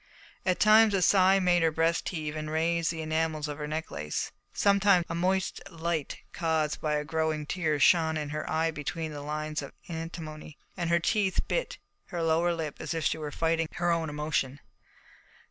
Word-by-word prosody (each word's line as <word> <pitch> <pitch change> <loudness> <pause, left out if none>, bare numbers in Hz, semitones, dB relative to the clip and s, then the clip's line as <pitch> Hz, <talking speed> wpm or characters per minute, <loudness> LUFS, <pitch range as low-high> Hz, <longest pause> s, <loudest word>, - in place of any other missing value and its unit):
At 185 - +2
times 215 0 +6
a 190 - +1
sigh 190 +1 +5
made 180 -2 +3
her 165 - +4
breast 165 +1 +1
heave 155 -4 -4
and 155 0 -4
raised 165 +1 +1
the 160 -1 -3
enamels 155 -1 -1
of 150 0 -6
her 150 - -3
necklace. 75 - -3 0.2
Sometimes 200 -3 +4
a - - -2
moist 185 +2 0
light 165 -3 -3 0.2
caused 160 -2 0
by 150 -1 0
a 150 0 -1
growing 160 -1 -1
tear 155 -3 -1
shone 160 +2 +4
in 150 -1 -3
her 155 +1 -4
eye 160 +1 +1
between 160 +1 -4
the 145 -1 -6
lines 150 +1 -3
of 140 - -9
antimony, 160 -2 -7 0.2
and 170 -3 -2
her 170 0 +4
tiny 200 +3 +2
teeth - - -2
bit - - -2 0.3
her 170 -3 -4
lower 165 +2 +2
lip 160 -3 -4
as - - -3
if 165 - -2
she - - +1
were 150 -1 -4
fighting 165 +1 0
her 175 0 0
own 165 -2 0
emotion. 150 -2 -2
160 Hz, 190 wpm, -29 LUFS, 155-170 Hz, 0.3 s, times